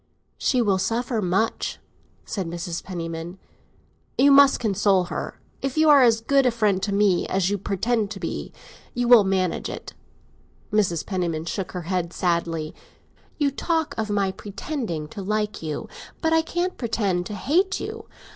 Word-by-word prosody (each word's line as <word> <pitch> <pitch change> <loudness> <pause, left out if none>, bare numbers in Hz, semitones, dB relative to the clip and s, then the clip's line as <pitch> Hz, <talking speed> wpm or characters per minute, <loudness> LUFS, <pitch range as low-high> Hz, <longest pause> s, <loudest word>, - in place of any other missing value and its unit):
"She 250 -3 +2
will 195 -3 +2
suffer 230 +2 -1
much," 195 +4 0 0.5
said 190 -4 -3
Mrs. 170 0 -4
Penniman. 165 -1 -5 0.8
"You 280 +2 +6
must 280 0 +7
console 200 -4 +2
her. - - -5 0.2
If 275 +1 -3
you 315 0 +5
are 285 -2 +8
as 230 -3 +4
good 275 +2 +3
a - - +6
friend 210 -5 +1
to 200 +1 -1
me 200 -3 +2
as 190 0 +1
you 205 - -1
pretend 205 +3 0
to 205 -2 -7
be, - - -4 0.4
you 245 0 0
will 240 -3 +8
manage 190 -3 0
it." - - -7 0.8
Mrs. 185 -6 +1
Penniman 170 -5 -2
shook 190 +1 -4
her 180 -1 -4
head 175 0 -2
sadly. 170 -3 -1 0.6
"You 290 -2 +2
talk 320 +2 -1
of 220 -1 -2
my 200 -2 +1
'pretending' 200 - -5
to 200 - -7
like 210 +1 -2
you; 155 -2 -4 0.3
but 320 0 +1
I 325 - +5
can't 350 +3 -2
pretend 200 -7 0
to 210 - -6
hate 365 - +1
you. - - -6
205 Hz, 165 wpm, -24 LUFS, 180-245 Hz, 0.8 s, are